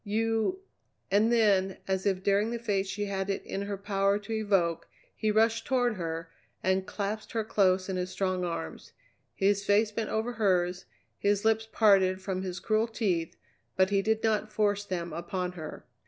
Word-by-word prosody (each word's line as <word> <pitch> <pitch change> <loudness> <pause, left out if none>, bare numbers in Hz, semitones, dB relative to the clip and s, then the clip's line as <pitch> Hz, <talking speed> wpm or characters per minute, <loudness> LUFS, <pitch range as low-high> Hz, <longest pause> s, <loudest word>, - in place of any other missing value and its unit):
"You 225 - 0 0.2
" - - -46
And 210 +4 +4
then 200 -5 +3
as 190 0 0
if 190 -1 0
daring 200 +2 +2
the 235 - -2
fate 205 -4 -1
she 205 +2 -3
had 195 -1 -3
it 195 - -2
in 195 - -4
her 200 0 -3
power 200 0 +1
to 210 +2 -6
evoke, 195 -6 +1 0.3
he 215 - -1
rushed 225 +2 +2
toward 245 -3 +2
her 165 -3 -5 0.3
and 190 0 +1
clasped 210 +1 -4
her 225 -1 0
close 190 -3 +2
in 190 -1 -2
his 180 0 -2
strong 185 -1 -1
arms. 165 - -5 0.4
His 200 +1 +2
face 205 +2 +3
was 210 - -21
bent 225 -2 -1
over 220 +2 -1
hers, 185 -5 +1 0.3
his 205 +1 +1
lips 220 0 +2
parted 190 -4 +4
from 190 -1 -3
his 185 -1 -4
cruel 215 +4 +1
teeth, 190 -8 -1 0.4
but 190 +1 +3
he 200 -1 +3
did 220 +2 0
not 215 -1 +1
force 205 -1 +1
them 175 -3 -4
upon 180 +1 -3
her. 160 -4 -8
200 Hz, 185 wpm, -29 LUFS, 185-215 Hz, 0.4 s, And